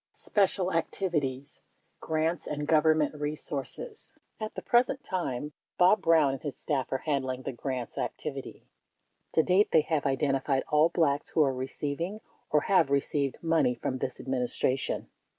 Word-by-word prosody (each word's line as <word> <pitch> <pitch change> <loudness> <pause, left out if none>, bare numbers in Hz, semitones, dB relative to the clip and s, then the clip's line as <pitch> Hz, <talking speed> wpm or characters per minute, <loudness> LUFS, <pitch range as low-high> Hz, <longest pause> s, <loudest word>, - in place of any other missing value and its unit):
376 - - -11 0.2
Special 185 -2 -2
Activities: 150 -5 -2 0.4
Grants 160 +1 -1
and 150 0 -3
Government 155 -1 +3
Resources 150 - -4 0.3
At 215 0 -5
the - - -6
present 250 +3 +2
time, 150 -6 -3 0.2
Bob 185 +4 +5
Brown 160 -4 +4
and 135 - -6
his 145 -3 -5
staff 140 -5 -2
are 135 - -2
handling 130 -4 -1
the - - -3
grants 130 -1 -4
activity. - - -5 0.7
To 160 - +4
date, 185 +5 +3
they 160 - +6
have 150 -2 -1
identified 135 0 +1
all 150 +2 +4
Blacks 145 -5 +1
who 155 - +3
are 135 -2 +1
receiving, 145 +9 -3 0.3
or 150 - +3
have 185 -6 +3
received, 140 0 0
money 160 -6 +2
from 130 +2 -3
this 130 - -3
Admin 130 -1 -2
istration. 130 +2 0
150 Hz, 150 wpm, -29 LUFS, 135-165 Hz, 0.7 s, they